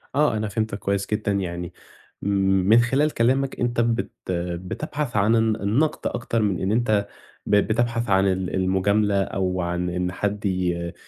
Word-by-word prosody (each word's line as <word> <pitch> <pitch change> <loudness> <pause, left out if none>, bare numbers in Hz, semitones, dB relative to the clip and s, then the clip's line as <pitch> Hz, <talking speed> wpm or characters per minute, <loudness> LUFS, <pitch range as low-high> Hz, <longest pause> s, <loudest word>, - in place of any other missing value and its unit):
آه، 145 -6 +3
أنا 110 - -2
فهمتك 110 0 -2
كويس 100 0 -1
جدًا، 105 -1 0
يعني 90 -3 -3 0.5
من 95 +2 +3
خلال 135 +6 +2
كلامك، 130 +3 +1
أنت 120 -1 +1
بت 115 0 0 0.5
بتبحث 145 - -4
عن 105 +3 +3
الن 110 -1 +2
النَقْد 115 +10 0
أكتر 115 -1 -2
من 100 -4 0
إن 95 +1 0
أنت 110 -3 +1 0.4
ب 105 - +2
بتبحث 115 +2 +1
عن 95 0 +4
ال 95 -1 -1
المُجاملة 100 +2 +2
أو 95 -1 -2
عن 90 0 -2
إن 90 +1 -2
حد 105 +2 -3
ي 90 -3 -1
100 Hz, 155 wpm, -23 LUFS, 95-115 Hz, 0.5 s, عن